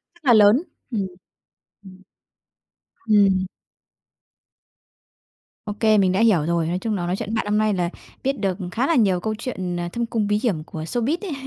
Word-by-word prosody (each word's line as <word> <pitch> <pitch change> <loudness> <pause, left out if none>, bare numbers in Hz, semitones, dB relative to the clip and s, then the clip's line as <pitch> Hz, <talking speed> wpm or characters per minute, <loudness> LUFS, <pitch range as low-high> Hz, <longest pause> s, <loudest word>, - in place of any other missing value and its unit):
rất 345 - -26
là 250 - +5
lớn. 215 +7 +6 0.3
Ừm. 205 -5 -1 0.8
Ừm. 190 -1 -14 1.1
Ừm. 195 -3 +4 2.2
Ô 210 - -3
kê, 215 -2 +4
mình 185 -2 +3
đã 190 - +1
hiểu 195 -10 +3
rồi. 170 -1 0
Nói 175 +2 -1
chung 220 +1 -2
là 175 -3 -2
nói 180 - -1
chuyện 210 0 -5
với 225 - -3
bạn 220 - -1
hôm 210 0 +1
nay 215 -1 +2
là 175 -2 -1 0.3
biết 270 +1 0
được 190 -2 -1
khá 245 +7 0
là 335 - +2
nhiều 195 - +3
câu 215 +3 -2
chuyện, 185 -7 -4
ờ, 175 0 -3
thâm 235 0 -2
cung 220 -3 -1
bí 210 0 +1
hiểm 180 -11 -1
của 160 -1 -7
showbiz 240 - -1
ấy. 385 -7 -5
205 Hz, 195 wpm, -22 LUFS, 185-225 Hz, 2.2 s, lớn